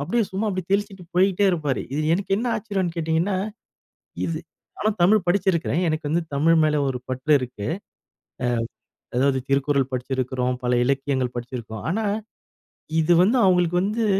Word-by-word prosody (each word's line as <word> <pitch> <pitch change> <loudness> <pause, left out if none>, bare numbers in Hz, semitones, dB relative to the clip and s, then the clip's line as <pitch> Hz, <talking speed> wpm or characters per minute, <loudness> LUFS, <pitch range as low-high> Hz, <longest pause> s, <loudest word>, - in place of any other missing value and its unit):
அப்படியே 225 +9 +1
சும்மா 195 +3 -1
அப்படியே 185 -3 -3
தெளிச்சுட்டு 200 -2 -1
போய்ட்டே 190 +2 +3
இருப்பாரு. 150 -6 -1
இது 145 - -1
எனக்கு 190 +3 -1
என்ன 230 +4 -2
ஆச்சரியம்ன்னு 200 -6 -2
கேட்டீங்கன்னா, 165 +4 0 0.9
இது 165 -1 -2 0.4
ஆனா 215 - +2
தமிழ் 195 +2 +5
படிச்சிருக்குறேன். 175 -3 +1
எனக்கு 155 -1 -2
வந்து 165 +3 +1
தமிழ் 160 +4 +4
மேல 150 -1 +2
ஒரு 130 -2 -2
பற்று 130 +4 0
இருக்கு. 125 -5 -6 1.5
அ - - -13
அதாவது 135 0 +3
திருக்குறள் 140 -1 +1
படிச்சிருக்குறோம். 130 0 -1
பல 125 - 0
இலக்கியங்கள் 135 -1 0
படிச்சுருக்கோம். 120 -3 -6
ஆனா, 220 +5 0 1.0
இது 165 +2 +4
வந்து 225 +7 +3
அவங்களுக்கு 180 -2 +3
வந்து, 215 +3 0
165 Hz, 145 wpm, -23 LUFS, 135-190 Hz, 1.5 s, தமிழ்